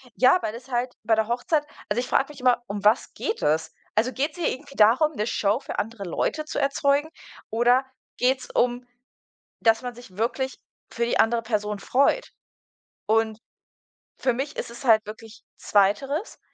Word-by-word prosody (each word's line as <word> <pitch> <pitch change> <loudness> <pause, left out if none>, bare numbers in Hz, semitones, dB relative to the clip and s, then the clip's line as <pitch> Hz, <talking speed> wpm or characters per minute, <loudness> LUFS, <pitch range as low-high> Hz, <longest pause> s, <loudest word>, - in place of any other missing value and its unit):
Ja, 260 +8 +5
weil 215 - -3
das 245 +3 -10
halt 245 0 -1
bei 225 0 +3
der 220 -1 +1
Hochzeit 290 +6 0 0.2
also 210 +4 +1
ich 250 - -2
frage 270 - +2
mich 295 -2 -11
immer, 250 -1 +3
um 205 -1 -5
was 215 +5 +3
geht 445 - -3
es? 155 +2 +1 0.2
Also 235 +4 +2
geht's 295 +5 -2
hier 345 - +1
irgendwie 275 +1 -9
darum, 245 +9 +5
'ne 210 - -1
Show 210 +2 +1
für - - -5
andere 220 -1 -4
Leute 305 - -2
zu 300 - -3
erzeugen 280 +2 +1 0.4
oder 240 +3 +3 0.3
geht's 255 +1 +1
um, 245 0 +1 0.8
dass 225 0 +3
man 245 -1 -5
sich 230 -6 -14
wirklich 260 +5 -2 0.3
für 235 - -1
die 235 - 0
andere 230 +1 +3
Person 210 -2 -2
freut? 280 - +2 0.8
Und 220 0 +1 0.8
für 255 - +1
mich 275 +5 -4
ist - - -4
es 235 - -10
halt 220 -4 +5
wirklich 220 +1 -11
zweiteres. 270 - +1
240 Hz, 175 wpm, -25 LUFS, 220-270 Hz, 0.8 s, Ja